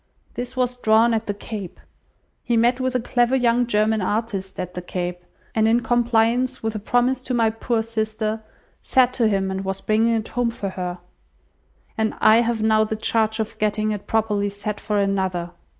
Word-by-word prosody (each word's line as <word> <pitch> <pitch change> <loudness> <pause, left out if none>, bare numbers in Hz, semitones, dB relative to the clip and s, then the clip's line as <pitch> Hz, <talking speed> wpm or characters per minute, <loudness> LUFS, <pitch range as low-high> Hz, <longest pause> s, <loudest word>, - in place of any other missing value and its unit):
This 245 +1 -6
was 250 -1 0
drawn 225 0 +4
at 225 0 -1
the 205 - -1
Cape. 205 -3 -7 0.6
He 240 -2 0
met 240 +3 +3
with 255 0 -1
a - - +3
clever 245 +1 +1
young 245 -1 +2
German 215 -1 +2
artist 200 -1 -2
at 180 0 -4
the 180 - -5
Cape, 180 0 -4 0.3
and 220 0 +3
in 235 +2 +3
compliance 240 +1 +1
with 220 0 -1
a 215 - -4
promise 245 +4 +1
to 255 0 -3
my 225 -2 +3
poor 225 0 -1
sister, 220 -1 -2 0.4
sat 255 -1 +3
to 235 -3 +2
him, 195 -2 0
and 190 0 -3
was 195 0 -3
bringing 225 +3 +2
it 220 -1 -3
home 245 -1 0
for 205 -4 -4
her; 180 -1 -4 1.0
and 220 0 0
I 215 +1 +6
have 230 -2 +1
now 220 0 +4
the 215 0 -2
charge 220 0 0
of 220 0 -4
getting 215 0 0
it 205 -1 -5
properly 210 -2 +1
set 205 +1 -5
for 210 -1 -2
another! 190 -3 0
220 Hz, 190 wpm, -22 LUFS, 205-235 Hz, 1.0 s, I